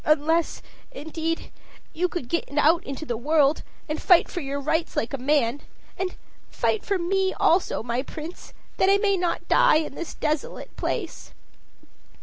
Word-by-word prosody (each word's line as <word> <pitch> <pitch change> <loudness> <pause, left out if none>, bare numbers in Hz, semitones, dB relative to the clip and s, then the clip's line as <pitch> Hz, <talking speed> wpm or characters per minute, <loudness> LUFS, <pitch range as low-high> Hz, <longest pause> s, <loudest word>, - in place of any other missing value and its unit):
"Unless, 310 +2 +1 0.3
indeed, 320 +3 -4 0.4
you 360 +3 +1
could 350 -8 -5
get 335 +7 -1
out 320 +3 +4
into 275 +3 -5
the 240 - -2
world, 295 +3 +3 0.3
and 305 0 -3
fight 355 -2 +5
for 350 - -4
your 280 0 -3
rights 320 +4 -1
like 225 - -1
a - - -1
man. 275 -1 +1 0.3
And 370 0 -3 0.3
fight 445 - 0
for 400 - 0
me 380 +2 0
also, 345 -8 +2
my 235 +2 -1
Prince, 315 +5 -9 0.3
that 380 - +4
I 395 - +6
may 400 -1 +2
not 355 -2 -1
die - - +5
in 310 -2 0
this 340 +3 -6
desolate 305 -1 -3
place." 365 -8 -4
320 Hz, 160 wpm, -25 LUFS, 285-355 Hz, 0.4 s, I